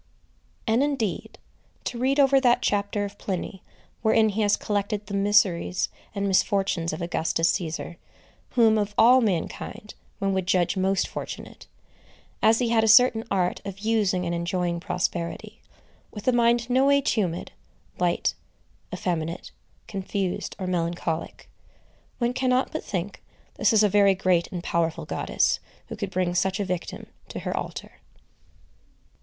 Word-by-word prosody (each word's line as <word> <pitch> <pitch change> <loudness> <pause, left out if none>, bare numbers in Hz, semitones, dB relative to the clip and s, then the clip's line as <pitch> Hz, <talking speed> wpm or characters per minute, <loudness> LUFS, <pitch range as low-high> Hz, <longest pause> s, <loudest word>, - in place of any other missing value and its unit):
And, 225 +3 +2
indeed, 270 -9 -2 0.5
to 240 - -4
read 270 +3 +1
over 275 -1 +5
that 245 -2 +3
chapter 205 0 0
of 200 0 -9
Pliny 190 0 -4 0.4
wherein 220 0 +4
he 210 +2 -2
has 205 -1 +3
collected 205 0 -2
the 200 - -8
miseries 190 - +2 0.3
and 200 0 -1
misfortunes 190 -3 +1
of 155 +2 -5
Augustus 165 -1 +1
Cæsar, 170 -1 -4 0.6
whom, 225 -3 +5
of 205 0 -2
all 250 +3 +7
mankind, 210 +1 -3 0.2
one 195 0 0
would 190 -1 -1
judge 180 -2 +2
most 190 0 +1
fortunate,—as 225 +1 -4
he 240 -1 0
had 225 -1 +3
a - - +2
certain 230 0 +6
art 180 -2 0
of 195 -1 -7
using 205 -4 +1
and 170 - -2
enjoying 170 0 -1
prosperity, 170 0 -3 0.5
with 210 +2 -10
a - - +6
mind 235 -1 +2
no 260 +2 +3
way 280 0 +5
tumid, 190 -10 -1 0.5
light, 175 -1 +1 0.6
effeminate, 170 -1 -3 0.4
confused, 195 -1 -3
or 190 - -4
melancholic,—one 175 +7 -4
cannot 255 0 +1
but - - -4
think 190 0 -4 0.3
this 215 0 +3
a - - +5
very 200 -1 +4
great 180 -2 +1
and 175 -2 -5
powerful 165 -2 -1
goddess, - - 0 0.3
who - - -5
could - - -4
bring 180 -1 -1
such 190 +2 0
a 200 - 0
victim 180 -2 -4 0.2
to - - -6
her - - -3
altar. - - -6
200 Hz, 140 wpm, -25 LUFS, 175-225 Hz, 0.6 s, all